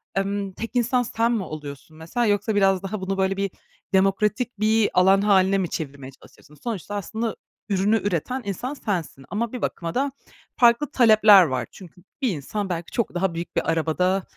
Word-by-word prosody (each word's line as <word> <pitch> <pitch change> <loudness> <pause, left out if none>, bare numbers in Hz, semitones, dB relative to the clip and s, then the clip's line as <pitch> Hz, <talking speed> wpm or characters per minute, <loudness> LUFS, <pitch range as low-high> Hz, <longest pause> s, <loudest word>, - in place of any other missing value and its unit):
emm, 195 0 -1
tek 230 +4 -6
insan 245 +1 +2
sen 230 0 0
mi 225 -5 0
oluyorsun 155 -1 -9
mesela 205 +10 -2
yoksa 210 +1 +1
biraz 195 -2 +3
daha 195 +1 -4
bunu 195 +1 -2
böyle 190 0 0
bir 200 -1 -1 0.4
demokratik 210 +4 +1
bir 215 0 +3
alan 190 +2 +5
hâline 195 -1 +4
mi 185 -3 -1
çevirmeye 140 -3 -6
çalışıyorsun? 145 +2 -19
Sonuçta, 205 +1 -5
aslında, 220 +3 -3 0.3
ürünü 200 +3 +2
üreten 205 - -2
insan 205 +7 -4
sensin 175 - -4
ama 225 +2 -2
bir 250 - -5
bakıma 165 -2 -3
da 275 +2 0 0.4
farklı 240 +4 +4
talepler 215 -5 +7
var. 130 -7 -2
Çünkü 180 -1 -14 0.2
bir 260 - +2
insan, 195 +4 -4
belki, 175 -1 -4
çok 235 - -1
daha 180 0 0
büyük 170 +1 -6
bir - - +1
arabada, 180 +4 0
195 Hz, 175 wpm, -23 LUFS, 175-220 Hz, 0.4 s, talepler